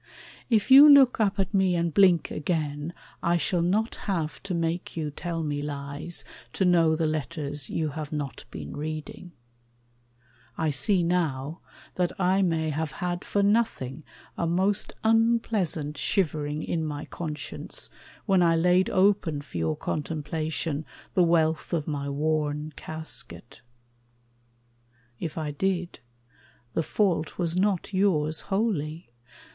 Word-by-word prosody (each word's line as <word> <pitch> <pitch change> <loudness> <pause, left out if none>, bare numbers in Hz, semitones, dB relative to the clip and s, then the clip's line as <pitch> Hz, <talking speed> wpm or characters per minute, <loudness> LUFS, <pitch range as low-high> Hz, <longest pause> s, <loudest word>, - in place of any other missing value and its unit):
If 225 +1 +2
you 280 +3 +11
look 275 -4 +7
up 205 -2 +2
at 195 +2 -1
me 190 -2 +3
and 170 -1 0
blink 185 -3 +4
again, 150 -1 -2 0.3
I 170 +1 +2
shall 175 +1 0
not 205 +7 +1 0.2
have 165 -5 -2
to 195 -2 -3
make 170 +1 -2
you 155 -2 -2
tell 165 +2 -4
me 145 -1 -2
lies 145 +3 -5 0.3
To 190 - +1
know 165 -3 +4
the 160 0 0
letters 150 -2 -3
you 155 -2 -1
have 150 0 -6
not 145 -3 -4
been 75 -2 -7
reading. 155 +4 -6 1.3
I 160 -2 +1
see 175 +7 +2
now 160 -3 -1 0.4
that 180 +2 -1
I 190 +1 +3
may 160 -4 +1
have 155 0 -3
had 175 0 -3
for 205 - 0
nothing 200 - 0 0.4
A 170 - +1
most 190 +4 +1
unpleasant 220 -9 +1
shivering 155 -4 0
in 165 -2 -1
my 150 -2 -4
conscience 155 -3 -6 0.3
When 195 -3 +3
I 165 -1 +4
laid 180 +3 +3
open 190 -6 +2
for 90 - -7
your 80 -1 0
contemplation 155 0 -3 0.3
The 185 - +3
wealth 160 -1 +2
of 155 -3 -1
my 140 -2 -2
worn 150 +1 -1
casket. 160 -6 -8 1.6
If 165 -2 -5
I 155 -2 -2
did, 180 +3 -2 0.7
The - - +1
fault 170 -2 0
was 170 -2 0
not 195 0 0
yours 160 -6 +2
wholly. 175 - -1
165 Hz, 135 wpm, -27 LUFS, 150-185 Hz, 1.6 s, you